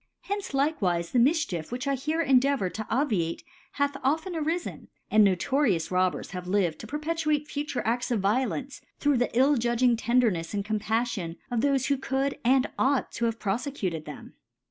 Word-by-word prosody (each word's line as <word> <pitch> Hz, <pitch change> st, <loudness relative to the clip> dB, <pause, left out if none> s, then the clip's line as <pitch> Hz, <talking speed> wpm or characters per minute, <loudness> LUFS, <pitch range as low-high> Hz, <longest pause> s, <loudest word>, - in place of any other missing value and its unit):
Uenqe 405 Hz, 0 st, -2 dB
likewifc 215 Hz, -, 0 dB
the 250 Hz, -, +3 dB
Mifchief 245 Hz, -, +1 dB
which 250 Hz, +3 st, -4 dB
I 275 Hz, -, +2 dB
here 310 Hz, +5 st, -1 dB
cndfavour 265 Hz, -7 st, +3 dB
tp 220 Hz, +4 st, -6 dB
obviate^ 210 Hz, -, 0 dB, 0.3 s
hath 285 Hz, 0 st, 0 dB
often.arilQri'5 320 Hz, +3 st, -1 dB, 0.2 s
apd 215 Hz, -, +6 dB
notorious 200 Hz, -, +2 dB
Robbers 180 Hz, -4 st, 0 dB
have 180 Hz, -1 st, -6 dB
lived 185 Hz, -4 st, +1 dB
to 220 Hz, -, -8 dB
per^ 295 Hz, +6 st, -4 dB
|)etr^te 305 Hz, -1 st, 0 dB
fuwe 295 Hz, -3 st, -3 dB
A&s 235 Hz, +2 st, 0 dB
of 235 Hz, -3 st, +1 dB
Violence, 255 Hz, +7 st, -1 dB, 0.2 s
through 290 Hz, -2 st, +2 dB
the 245 Hz, -, +1 dB
ill 275 Hz, +3 st, +5 dB
}udging 240 Hz, 0 st, +2 dB
Tendernefi 225 Hz, -7 st, +1 dB
and 200 Hz, -1 st, -2 dB
Compdfion 215 Hz, -4 st, -1 dB
of 240 Hz, -, 0 dB
thdiie 275 Hz, 0 st, +2 dB
who 280 Hz, -, +1 dB
could 270 Hz, +1 st, -1 dB
and 255 Hz, +2 st, +4 dB
ought 270 Hz, -1 st, +1 dB
to 235 Hz, -, -2 dB
have 230 Hz, -1 st, -1 dB
pro 200 Hz, -3 st, -1 dB
fccuted 200 Hz, -, -3 dB
them. -, -, -10 dB
245 Hz, 170 wpm, -27 LUFS, 205-285 Hz, 0.3 s, apd